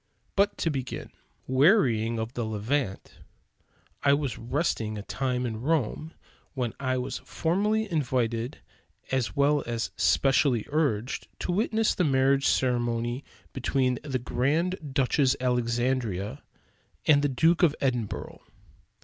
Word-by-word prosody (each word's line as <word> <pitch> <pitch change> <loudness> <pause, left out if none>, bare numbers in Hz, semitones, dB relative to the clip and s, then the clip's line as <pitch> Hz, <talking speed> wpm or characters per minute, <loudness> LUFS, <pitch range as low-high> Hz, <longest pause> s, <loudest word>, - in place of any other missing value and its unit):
But 200 +1 +2
to 165 - 0
begin. 130 -3 -5 0.3
Wearying 130 - +3
of 110 +2 -4
the 120 - -2
Levant, 110 0 -2 0.8
I 140 - +4
was 140 -3 -1
resting 115 -4 -1
a 100 - -6
time 125 +2 -2
in 110 -2 -4
Rome, 155 +2 -1 0.4
when 125 -4 -2
I 130 -1 0
was 125 +1 -3
formally 210 +6 0
invited, 125 -5 -1 0.5
as 130 -1 0
well 145 0 +3
as 115 0 -2
specially 135 -4 +3
urged, 140 -6 -1
to - - -1
witness 220 +3 +1
the 180 - 0
marriage 135 -1 +3
ceremony 120 0 0 0.3
between 130 -1 0
the 140 -3 -2
Grand 150 +7 -1
Duchess 135 0 +2
Alexandria 120 -4 -1 0.6
and 145 -2 +5
the 145 - +1
Duke 165 +6 +3
of 160 -4 +4
Edinburgh. 120 -6 -2
130 Hz, 125 wpm, -27 LUFS, 120-150 Hz, 0.8 s, and